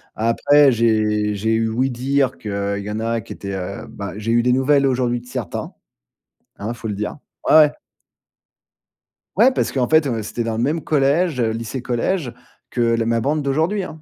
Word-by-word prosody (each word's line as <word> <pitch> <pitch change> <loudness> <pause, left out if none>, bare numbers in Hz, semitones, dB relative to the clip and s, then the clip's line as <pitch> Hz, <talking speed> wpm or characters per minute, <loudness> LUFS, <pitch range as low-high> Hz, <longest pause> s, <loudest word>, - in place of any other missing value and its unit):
Après 135 +6 +4
j'ai 110 -2 +1
j'ai 110 +3 0
eu 115 0 +1
ouï-dire 130 +3 0
qu'il 100 -1 -3
y 105 - -6
en 105 - -3
a 115 +1 -1
qui - - -9
étaient, 100 -1 -6
heu, 95 +1 -5
bah 100 -3 -7
j'ai 110 +2 -2
eu 120 0 +3
des 125 0 +3
nouvelles 140 +2 +3
aujourd'hui 125 -2 0
de - - -19
certains. 125 -8 -5 0.9
Hein, 105 +3 -4
faut 110 -1 -7
le 105 - -2
dire. 105 +1 -4 0.3
Ouais, - - +5
ouais. 150 -2 +7 1.6
Ouais, 235 +7 +5
parce - - -1
qu'en 125 -3 0
fait, 155 0 +4
heu, 115 -4 -2
c'était 120 +3 -3
dans 115 -1 -2
le 115 - 0
même 155 +5 0
collège 150 +1 +1
lycée-collège, 120 - -2 0.4
que 120 - -1
la 115 -1 +2
ma 115 0 +1
bande 150 +5 0
d'aujourd'hui, 160 +9 0
hein. 160 -3 -9
120 Hz, 185 wpm, -20 LUFS, 110-140 Hz, 1.6 s, ouais